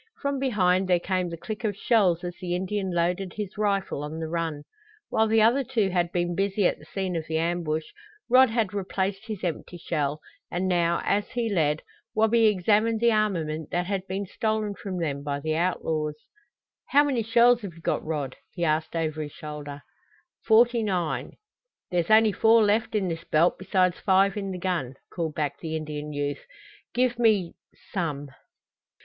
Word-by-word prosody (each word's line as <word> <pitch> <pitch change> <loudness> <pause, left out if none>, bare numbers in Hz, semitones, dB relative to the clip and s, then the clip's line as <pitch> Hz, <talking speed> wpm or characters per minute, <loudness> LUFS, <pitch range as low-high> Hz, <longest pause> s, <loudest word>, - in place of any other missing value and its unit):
From 280 -1 -1
behind 190 -8 +2
there 180 -1 +3
came 185 0 -1
the 170 - -6
click 215 +7 -6
of 205 -3 -1
shells 190 -7 +2
as 175 0 -4
the 175 -1 -2
Indian 190 +1 -2
loaded 175 +2 0
his 210 -2 -5
rifle 200 -7 0
on 155 +2 -5
the 160 - -3
run. 160 -3 -3 0.5
While 220 0 +2
the 220 0 +4
other 245 +5 +4
two 230 -6 0
had 175 -2 0
been 175 0 0
busy 195 +2 0
at - - +1
the - - -15
scene 190 -2 -3
of 160 -1 -3
the 160 - -1
ambush 165 -1 -1 0.4
Rod 255 +1 +6
had 220 -4 0
replaced 195 +1 -2
his 215 -4 -6
empty 175 0 -4
shell, 150 -3 -2 0.3
and 180 +2 -1
now, 170 -2 +2
as 205 0 +1
he 235 -3 -1
led, 155 -3 +1 0.3
Wabi 220 +1 +4
examined 215 +3 +2
the 235 +1 +4
armament 165 -8 0
that 175 0 -1
had 195 0 -3
been 195 +2 -3
stolen 215 +1 -1
from 190 -1 -6
them 145 -5 -2
by 140 0 -3
the 155 +2 -1
outlaws. 160 -3 -1 0.7
"How 290 +1 +5
many 270 -5 0
shells 235 +2 +4
have 190 -6 -7
you 165 - -14
got, - - -1
Rod?" 150 -4 -3
he 175 -2 -2
asked 155 +1 0
over 155 -1 -1
his 150 -1 -6
shoulder. 145 -2 -8 0.6
"Forty 235 +1 +5
nine." 180 -6 -2 0.6
"There's 175 -2 0
only 220 0 +6
four 225 +3 +5
left 215 +2 +1
in 200 -3 +1
this 165 -1 -4
belt 165 +3 +2
besides 185 -1 +1
five 195 0 +3
in 200 -2 -3
the 185 - -4
gun," 170 -8 -2 0.2
called 165 -3 -3
back 145 -2 -2
the 160 -1 -4
Indian 150 -1 -5
youth. 145 0 -3 0.5
"Give 245 -1 +1
me 210 -7 +3 0.4
some." 150 -6 -3
185 Hz, 180 wpm, -26 LUFS, 160-215 Hz, 0.7 s, Rod